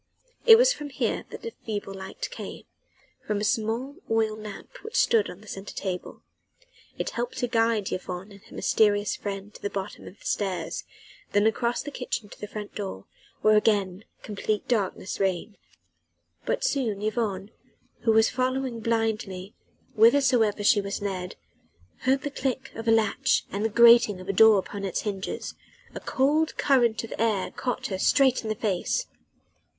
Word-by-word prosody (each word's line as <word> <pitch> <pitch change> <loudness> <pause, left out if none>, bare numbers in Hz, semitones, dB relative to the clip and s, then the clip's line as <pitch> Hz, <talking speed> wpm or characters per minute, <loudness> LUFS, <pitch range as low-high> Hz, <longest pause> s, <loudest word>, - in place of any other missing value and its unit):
It 450 -1 +11
was - - +5
from 295 -9 -7
here 265 - -1
that - - -9
the 460 - -5
feeble 205 -3 -4
light 195 - -6
came - - -7 0.6
from 210 - 0
a - - -2
small 230 +6 -1
oil 220 -1 +1
lamp 215 - -9
which 445 - -8
stood 455 -2 +3
on 180 - -10
the 215 - -16
centre 195 0 -7
table. 185 -2 -5 0.7
It - - -2
helped 240 +1 -4
to 245 - 0
guide 225 -3 +1
Yvonne 185 +2 -5
and 200 -1 -14
her - - -14
mysterious 205 -1 +2
friend 200 0 -6
to - - -13
the 205 - -2
bottom 195 -1 -6
of 200 - -12
the - - -18
stairs, 185 -5 -2 0.5
then 205 +1 +4
across 235 +2 +1
the 290 - -6
kitchen 245 -5 -4
to - - -13
the 210 - -4
front 210 0 -7
door, 190 - -5 0.4
where 215 0 +6
again 205 -3 +2 0.2
complete 210 0 -2
darkness 205 -5 -1
reigned. 195 +2 -1 0.9
But - - 0
soon 235 - 0
Yvonne 215 -3 -2 0.5
who 225 - +2
was 220 0 +5
following 255 -1 -1
blindly 220 -4 -1 0.4
whithersoever 230 -2 +4
she 205 0 +5
was 200 +1 -4
led 185 -3 -3 0.7
heard 265 +2 +3
the 290 - -3
click 265 -1 -3
of 225 +1 -7
a - - +5
latch 220 -2 +2
and 200 +2 -2
the 220 - +2
grating 235 -3 +6
of 185 - -10
a 195 - 0
door 220 +1 +7
upon 200 +1 -4
its 190 -3 -1
hinges: 200 -2 -4 0.4
a - - -5
cold 300 +4 +1
current 240 -6 +3
of 230 - -6
air 215 -4 +1
caught 250 -2 -3
her 190 -2 -3
straight 265 +4 +4
in 220 - -5
the 215 - 0
face. 210 - -1
215 Hz, 170 wpm, -26 LUFS, 200-240 Hz, 0.9 s, It